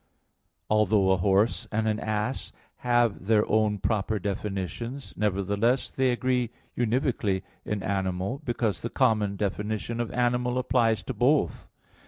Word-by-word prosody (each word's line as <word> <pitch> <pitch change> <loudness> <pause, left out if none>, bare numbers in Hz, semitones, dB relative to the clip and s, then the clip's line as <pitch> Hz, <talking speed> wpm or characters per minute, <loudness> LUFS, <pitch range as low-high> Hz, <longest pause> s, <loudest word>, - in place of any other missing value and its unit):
Although 105 -2 +3
a 95 - +4
horse 100 +5 +2
and 110 0 0
an 110 0 0
ass 110 +4 -2 0.3
have 120 -5 +1
their 110 -1 +4
own 110 -1 +2
proper 110 +2 0
definitions, 100 +6 -4
nevertheless 105 +5 +1
they 130 -1 +2
agree 125 -1 0 0.3
univocally 115 -5 0 0.2
in 105 -2 -2
animal, 95 +5 -2
because 115 -4 -1
the 115 - -3
common 110 -7 +2
definition 105 +3 -2
of 120 - -2
animal 125 0 +1
applies 115 -3 +2
to 130 - -4
both. 130 +6 +1
110 Hz, 130 wpm, -27 LUFS, 100-120 Hz, 0.3 s, a